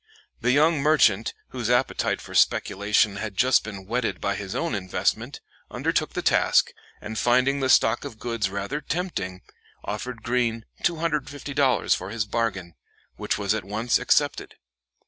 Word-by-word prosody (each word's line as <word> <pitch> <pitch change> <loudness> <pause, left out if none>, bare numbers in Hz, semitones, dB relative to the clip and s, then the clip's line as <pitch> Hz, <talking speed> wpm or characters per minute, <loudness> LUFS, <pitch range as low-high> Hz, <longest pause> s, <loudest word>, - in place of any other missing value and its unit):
The 125 - 0
young 150 +4 +4
merchant, 125 -9 +3
whose 120 -3 -4
appetite 125 +2 +1
for - - -11
speculation 100 0 +2
had 105 -3 -5
just 130 0 +4
been 100 -3 -8
whetted 120 +3 -2
by 100 - -1
his 100 -1 -6
own 165 -5 -1
investment, 95 -3 -2 0.3
undertook - - -1
the - - -3
task, - - +3 0.3
and, 110 +1 -5
finding 130 +3 +3
the 130 -1 0
stock 115 -2 +4
of 110 - -8
goods 115 -4 -2
rather 100 +9 -4
tempting, 155 - -3 0.4
offered 115 +3 -5
Greene 115 -2 0 0.2
$250 145 -5 0
for 95 - -6
his 110 0 -2
bargain, 100 -6 -2 0.4
which - - -1
was 100 -1 0
at 110 - -3
once 110 +4 0
accepted. - - +1
115 Hz, 145 wpm, -25 LUFS, 100-130 Hz, 0.4 s, young